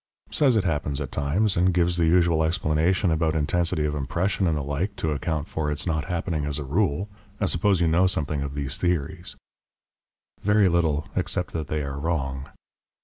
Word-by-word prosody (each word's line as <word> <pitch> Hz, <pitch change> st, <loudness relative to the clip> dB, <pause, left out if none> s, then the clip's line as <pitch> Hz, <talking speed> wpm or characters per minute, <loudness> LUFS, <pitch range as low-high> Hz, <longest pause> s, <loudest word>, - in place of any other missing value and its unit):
"Says 135 Hz, -5 st, +3 dB
it 105 Hz, -, +2 dB
happens 75 Hz, -5 st, -1 dB
at 70 Hz, -3 st, -5 dB
times 90 Hz, +9 st, +1 dB
and 90 Hz, 0 st, +2 dB
gives 85 Hz, 0 st, +2 dB
the 85 Hz, -1 st, +3 dB
usual 85 Hz, -1 st, +3 dB
explanation 85 Hz, +2 st, +1 dB
about 80 Hz, 0 st, +1 dB
intensity 80 Hz, +1 st, +1 dB
of 75 Hz, -, -1 dB
impression 90 Hz, +7 st, -1 dB
and 80 Hz, -2 st, +1 dB
the 75 Hz, -, -2 dB
like 75 Hz, +9 st, -2 dB
to 80 Hz, -, -2 dB
account 75 Hz, +1 st, -2 dB
for 80 Hz, -2 st, -2 dB
its 75 Hz, 0 st, -2 dB
not 80 Hz, -3 st, -1 dB
happening 85 Hz, -3 st, -2 dB
as 75 Hz, 0 st, -2 dB
a 75 Hz, -, -4 dB
rule. 85 Hz, +4 st, 0 dB, 0.3 s
I -, -, +1 dB
suppose 95 Hz, +1 st, +2 dB
you 85 Hz, -, +3 dB
know 85 Hz, +4 st, +4 dB
something 75 Hz, -5 st, -1 dB
of 70 Hz, 0 st, -4 dB
these 70 Hz, -2 st, -3 dB
theories 90 Hz, 0 st, -2 dB, 0.5 s
" -, -, -45 dB
"Very 105 Hz, 0 st, +4 dB
little 80 Hz, -3 st, +1 dB
except 90 Hz, 0 st, -1 dB
that 80 Hz, -3 st, -3 dB
they 75 Hz, -1 st, -2 dB
are 70 Hz, 0 st, -4 dB
wrong." 70 Hz, -4 st, -2 dB
80 Hz, 195 wpm, -25 LUFS, 75-90 Hz, 0.5 s, know